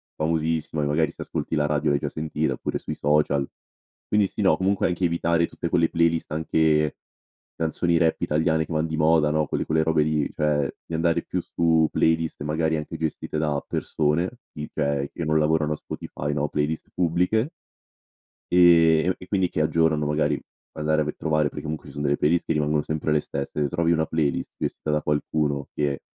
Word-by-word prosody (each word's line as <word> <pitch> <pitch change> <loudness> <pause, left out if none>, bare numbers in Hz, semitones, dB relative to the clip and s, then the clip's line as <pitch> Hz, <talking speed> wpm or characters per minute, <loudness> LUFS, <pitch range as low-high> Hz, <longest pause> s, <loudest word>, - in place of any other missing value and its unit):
famosissima 80 -1 -1
e - - +1
magari 75 +2 +1
se - - -8
ascolti - - -3
la 75 -1 +2
radio 75 0 +1
l'hai 70 0 +2
già - - -3
sentita, 80 0 -2
oppure - - -3
sui - - -5
social. 75 -1 +1 0.6
Quindi 105 -2 +3
sì, 105 - -5
no 85 -5 +5
comunque 95 +3 0
anche 90 0 0
evitare 85 0 +1
tutte 85 - -5
quelle 85 -2 +2
playlist 85 -2 +1
anche, 80 -1 +1 0.6
canzoni 85 +1 +1
rap 80 -1 +1
italiane 80 +1 +1
che 80 - -5
van 80 +1 +1
di 80 -1 -4
moda 80 -1 +4
no, 75 -1 +1
quelle - - -2
quelle 80 0 +1
robe 80 -1 +2
lì, 75 -1 0
cioè 75 -2 +1
di 80 - -9
andare 85 +1 +1
più 90 - -3
su 80 -2 +2
playlist 80 -2 +1
magari 80 +1 0
anche 75 +2 -6
gestite 80 -1 -3
da 75 -2 0
persone, 80 +3 0 0.2
si 75 0 -6
cioè 70 -2 -1
che 85 - -4
non 80 0 +2
lavorano 75 0 +2
a - - -2
Spotify 75 -1 -5
no, 70 +1 0
playlist 75 +1 -2
pubbliche 90 - +1 1.0
ehm, 85 -1 +5
e - - -4
q - - -37
e 90 - -10
quindi 95 -3 +1
che - - -1
aggiornano 80 -1 +2
magari 75 -1 +1 0.4
andare 80 0 +1
per 75 - -4
trovare 75 -2 +1
perché - - -7
comunque 75 -1 -5
ci - - -10
sono 75 0 -3
delle 70 +1 +2
playlist 85 +3 +1
rimangono 75 -1 +1
sempre 75 0 -2
le 75 - +3
stesse; 70 +1 -4
se 75 - +2
trovi 85 -1 +1
una 80 -1 +2
playlist 75 -3 -1
gestita 75 - -3
da 75 0 +1
qualcuno 75 -1 -1
che 70 -2 -1
80 Hz, 195 wpm, -24 LUFS, 75-80 Hz, 1.0 s, no